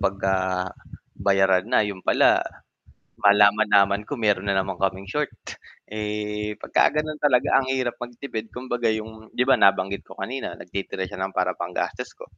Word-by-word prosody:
'pagka 95 Hz, -1 st, 0 dB, 0.8 s
bayaran 95 Hz, 0 st, +2 dB
na, 110 Hz, -, +3 dB
'yon 100 Hz, -2 st, -5 dB
pala -, -, +4 dB, 0.8 s
malaman-laman 105 Hz, 0 st, +4 dB
ko 145 Hz, -, -3 dB
meron 105 Hz, -4 st, +1 dB
na 100 Hz, -, +1 dB
naman 95 Hz, -1 st, -2 dB
kaming 95 Hz, 0 st, -1 dB
short. 150 Hz, 0 st, 0 dB, 0.6 s
Eh, 105 Hz, 0 st, -3 dB
pagka -, -, +2 dB
gano'n 155 Hz, 0 st, -6 dB
talaga 140 Hz, -2 st, +3 dB
ang 130 Hz, -, -5 dB
hirap 130 Hz, -2 st, -1 dB
magtipid, 120 Hz, -2 st, -6 dB
kumbaga 120 Hz, -1 st, -2 dB
'yung 110 Hz, 0 st, -4 dB
'di 125 Hz, -, +3 dB
ba, 135 Hz, 0 st, +3 dB
nabanggit 100 Hz, 0 st, +3 dB
ko -, -, -12 dB
kanina 130 Hz, +3 st, -5 dB
nagtitira 95 Hz, 0 st, -5 dB
siya 95 Hz, -, -8 dB
ng 95 Hz, 0 st, -3 dB
para -, -, +1 dB
panggastos -, -, -4 dB
ko. -, -, -11 dB
105 Hz, 155 wpm, -24 LUFS, 95-120 Hz, 0.8 s, pala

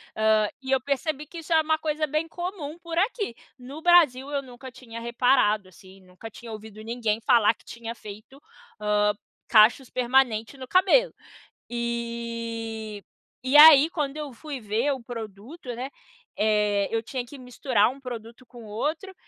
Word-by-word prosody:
Hã, 220 Hz, -1 st, +3 dB
e 265 Hz, 0 st, -5 dB
eu 265 Hz, -, +4 dB
percebi 285 Hz, +2 st, -2 dB
que 335 Hz, -, -9 dB
isso 325 Hz, +1 st, -11 dB
é 320 Hz, -1 st, +5 dB
uma 315 Hz, 0 st, +1 dB
coisa 310 Hz, 0 st, -2 dB
bem 305 Hz, +3 st, -1 dB
comum, 345 Hz, -3 st, -6 dB
por 335 Hz, -1 st, -6 dB
aqui. 405 Hz, -, 0 dB, 0.2 s
No 275 Hz, +5 st, -9 dB
Brasil, 295 Hz, -7 st, +4 dB
eu 280 Hz, -1 st, -1 dB
nunca 255 Hz, 0 st, -11 dB
tinha 230 Hz, -2 st, -10 dB
reparado, 235 Hz, -4 st, +2 dB
assim. 190 Hz, +1 st, -17 dB
Nunca 185 Hz, +5 st, -12 dB
tinha 230 Hz, +1 st, -11 dB
ouvido 215 Hz, 0 st, -9 dB
ninguém 225 Hz, -2 st, -1 dB
falar 220 Hz, 0 st, +4 dB
que -, -, -27 dB
tinha 235 Hz, 0 st, -7 dB
feito, 215 Hz, +6 st, -12 dB, 0.4 s
hã, 210 Hz, 0 st, +2 dB, 0.3 s
cachos 235 Hz, +4 st, +5 dB
permanente 250 Hz, -1 st, +1 dB
no 260 Hz, -1 st, -9 dB
cabelo. 390 Hz, -, +4 dB, 0.6 s
E 230 Hz, -3 st, -4 dB, 0.4 s
e 275 Hz, +3 st, +4 dB
aí, 305 Hz, 0 st, +10 dB
quando 295 Hz, -4 st, -3 dB
eu 295 Hz, -3 st, -5 dB
fui 280 Hz, -1 st, -7 dB
ver 220 Hz, +7 st, 0 dB
o 260 Hz, -3 st, -8 dB
produto, 235 Hz, -, -8 dB
né, 255 Hz, +3 st, -5 dB, 0.5 s
eh, 210 Hz, -2 st, +2 dB
eu 225 Hz, 0 st, -1 dB
tinha 250 Hz, +1 st, -4 dB
que 280 Hz, +3 st, -12 dB
misturar 250 Hz, -3 st, +1 dB
um 270 Hz, +2 st, -9 dB
produto 235 Hz, -1 st, -9 dB
com 240 Hz, -1 st, -13 dB
outro 305 Hz, -, -3 dB
245 Hz, 160 wpm, -25 LUFS, 220-290 Hz, 0.6 s, aí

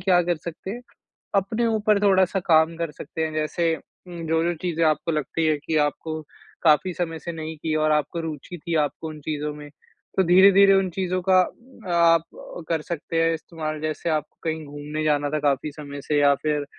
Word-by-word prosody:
क्या 180 Hz, -1 st, +4 dB
कर 175 Hz, 0 st, 0 dB
सकते 170 Hz, +4 st, -7 dB
हैं, 235 Hz, +4 st, -5 dB, 0.5 s
अपने 210 Hz, +4 st, +1 dB
ऊपर 215 Hz, -2 st, +2 dB
थोड़ा-सा 190 Hz, -1 st, +3 dB
काम 165 Hz, -1 st, +3 dB
कर 165 Hz, -1 st, -3 dB
सकते 160 Hz, +2 st, -6 dB
हैं। 155 Hz, -, -3 dB
जैसे 160 Hz, +2 st, 0 dB
उम, 170 Hz, -1 st, -11 dB
जो-जो 165 Hz, +2 st, +1 dB
चीज़ें 165 Hz, -2 st, 0 dB
आपको 155 Hz, +2 st, +1 dB
लगती 155 Hz, +2 st, -1 dB
हैं 155 Hz, -1 st, +2 dB
कि 160 Hz, -, 0 dB
आपको 155 Hz, +2 st, -4 dB, 0.4 s
काफ़ी 165 Hz, +3 st, +4 dB
समय 165 Hz, -2 st, -3 dB
से 170 Hz, +2 st, -6 dB
नहीं 160 Hz, -1 st, -6 dB
की 155 Hz, +1 st, -2 dB
और 155 Hz, 0 st, +2 dB
आपको 150 Hz, +3 st, 0 dB
रूचि 160 Hz, +2 st, -6 dB
थी 170 Hz, +1 st, -4 dB
आपको 160 Hz, +3 st, -8 dB
उन 155 Hz, -1 st, -9 dB
चीज़ों 150 Hz, 0 st, -3 dB
में, 150 Hz, 0 st, -10 dB, 0.5 s
तो 190 Hz, -, +5 dB
धीरे-धीरे 195 Hz, +2 st, +7 dB
उन 195 Hz, -1 st, +2 dB
चीज़ों 185 Hz, +1 st, -1 dB
का 185 Hz, -1 st, +6 dB, 0.6 s
आप 165 Hz, -1 st, +5 dB, 0.5 s
कर 165 Hz, -2 st, 0 dB
सकते 165 Hz, 0 st, -2 dB
हैं 165 Hz, 0 st, +2 dB
इस्तेमाल। 155 Hz, -1 st, -5 dB
जैसे 155 Hz, +2 st, -2 dB
आपको 155 Hz, -3 st, -2 dB
कहीं 160 Hz, -1 st, -2 dB
घूमने 145 Hz, +2 st, -5 dB
जाना 145 Hz, -1 st, +1 dB
था 155 Hz, -, 0 dB
काफ़ी 145 Hz, 0 st, 0 dB
समय 145 Hz, -1 st, -8 dB
से 150 Hz, +1 st, 0 dB
या 140 Hz, -1 st, +5 dB
फिर 150 Hz, -1 st, 0 dB
160 Hz, 195 wpm, -24 LUFS, 155-175 Hz, 0.6 s, धीरे-धीरे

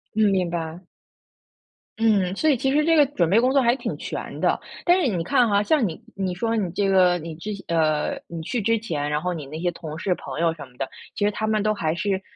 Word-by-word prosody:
嗯， 215 Hz, -1 st, +4 dB
明 185 Hz, -3 st, +1 dB
白。 165 Hz, -1 st, -4 dB, 1.2 s
嗯， 205 Hz, -5 st, +2 dB
所 315 Hz, +8 st, +2 dB
以 285 Hz, -, +5 dB
其 265 Hz, +2 st, 0 dB
实 300 Hz, +2 st, +3 dB
这 330 Hz, 0 st, +4 dB
个 295 Hz, -, +6 dB
准 180 Hz, -, 0 dB
备 210 Hz, +6 st, +5 dB
工 255 Hz, +2 st, +3 dB
作 275 Hz, 0 st, +4 dB
还 240 Hz, 0 st, +3 dB
挺 -, -, -4 dB
全 -, -, -6 dB
的， -, -, +2 dB, 0.3 s
但 350 Hz, +1 st, +5 dB
是 305 Hz, -, +2 dB
你 185 Hz, -8 st, -1 dB
看 230 Hz, +6 st, +3 dB
哈， 200 Hz, 0 st, +3 dB
像 265 Hz, +2 st, +2 dB
你 165 Hz, +4 st, -7 dB
你 190 Hz, -2 st, -2 dB
说 225 Hz, +5 st, -1 dB
你 200 Hz, -5 st, 0 dB
这 200 Hz, +2 st, 0 dB
个 185 Hz, -2 st, +4 dB
你 160 Hz, 0 st, -7 dB
之 205 Hz, +6 st, -5 dB
前 195 Hz, -, -9 dB
呃， 160 Hz, -, +1 dB
你 170 Hz, -1 st, -6 dB
去 230 Hz, +9 st, -2 dB
之 230 Hz, +2 st, +2 dB
前， 150 Hz, -9 st, -3 dB
然 150 Hz, 0 st, 0 dB
后 180 Hz, +2 st, -1 dB
你 155 Hz, -5 st, -6 dB
那 155 Hz, +3 st, -7 dB
些 175 Hz, +1 st, 0 dB
同 160 Hz, -2 st, -8 dB
事 185 Hz, -3 st, 0 dB
朋 -, -, -7 dB
友 165 Hz, -1 st, +2 dB
什 150 Hz, -3 st, -9 dB
么 125 Hz, -1 st, -22 dB
的， -, -, -3 dB, 0.3 s
其 205 Hz, -, 0 dB
实 210 Hz, -, +2 dB
他 215 Hz, +1 st, -3 dB
们 215 Hz, -1 st, +1 dB
都 215 Hz, +1 st, +2 dB
还 160 Hz, -6 st, -1 dB
是， 195 Hz, +1 st, -1 dB
195 Hz, 275 characters per minute, -24 LUFS, 165-225 Hz, 1.2 s, 个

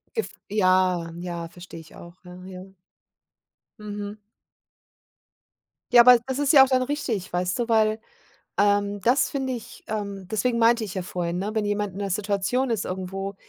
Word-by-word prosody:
Gef 450 Hz, -, -2 dB, 0.2 s
ja, 185 Hz, -4 st, +2 dB
ja, 170 Hz, -2 st, -5 dB
verstehe 175 Hz, -1 st, -11 dB
ich 160 Hz, -1 st, -15 dB
auch. 170 Hz, +1 st, -12 dB
Ja, 180 Hz, 0 st, -12 dB
ja. 185 Hz, -1 st, -9 dB, 1.2 s
Mhm. 205 Hz, 0 st, -6 dB, 1.7 s
Ja, 240 Hz, -1 st, +9 dB
aber 245 Hz, 0 st, +8 dB
das 265 Hz, 0 st, -2 dB
ist 290 Hz, 0 st, +3 dB
ja 270 Hz, -3 st, +9 dB
auch -, -, -5 dB
dann 255 Hz, -1 st, +2 dB
richtig, 255 Hz, -8 st, -3 dB
weißt 180 Hz, +4 st, -1 dB
du, 235 Hz, 0 st, -1 dB
weil, 220 Hz, -1 st, +3 dB, 0.6 s
ähm 205 Hz, 0 st, +2 dB
das 260 Hz, +5 st, +3 dB
finde 265 Hz, -2 st, -2 dB
ich 235 Hz, -, -9 dB
ähm, 200 Hz, -3 st, -5 dB
deswegen 235 Hz, +2 st, 0 dB
meinte 230 Hz, 0 st, +4 dB
ich 200 Hz, -3 st, -6 dB
ja 185 Hz, -, -2 dB
vorhin, 175 Hz, -1 st, -3 dB
ne, 200 Hz, +3 st, -3 dB
wenn 220 Hz, -1 st, 0 dB
jemand 205 Hz, -2 st, -2 dB
in 195 Hz, -, -8 dB
'ner 200 Hz, -1 st, -2 dB
Situation 205 Hz, +6 st, 0 dB
ist 220 Hz, -, -1 dB
irgendwo, 190 Hz, +1 st, -5 dB
205 Hz, 170 wpm, -24 LUFS, 185-235 Hz, 1.7 s, Ja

